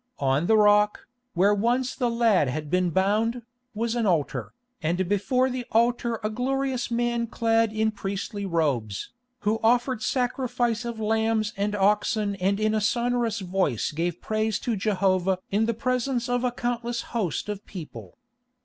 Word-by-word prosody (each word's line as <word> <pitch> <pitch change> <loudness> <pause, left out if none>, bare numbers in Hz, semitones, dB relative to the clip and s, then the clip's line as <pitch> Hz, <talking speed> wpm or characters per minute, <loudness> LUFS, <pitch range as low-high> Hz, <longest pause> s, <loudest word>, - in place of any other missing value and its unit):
On 140 +4 +1
the 220 - +5
rock, 210 0 +4 0.3
where 195 +4 +4
once 240 +5 +1
the 245 -3 0
lad 230 - +3
had 150 +3 -4
been 180 -1 +2
bound, 215 +7 +1 0.3
was 230 +1 -1
an 235 -3 0
altar, 165 -6 -1 0.3
and 175 +3 0
before 250 +7 +1
the 255 -1 -3
altar 235 0 +1
a 215 - 0
glorious 260 +1 -1
man 235 0 0
clad 225 -1 +1
in 220 0 +1
priestly 200 0 -4
robes, 140 - -1 0.3
who 215 +2 0
offered 240 +1 +2
sacrifice 245 -1 -1
of 235 -2 -5
lambs 220 0 +1
and 205 +1 -1
oxen 205 +1 +1
and 195 +2 0
in 215 0 +1
a 215 - +1
sonorous 235 0 0
voice 180 - 0
gave 170 +3 -2
praise 215 -1 0
to 235 - -2
Jehovah 190 -2 +1
in 215 +3 +2
the 230 - 0
presence 255 +1 -1
of 245 0 0
a 250 - +1
countless 240 -1 -2
host 210 -8 -1
of 205 -1 -5
people. 175 -6 -9
220 Hz, 160 wpm, -26 LUFS, 195-240 Hz, 0.3 s, the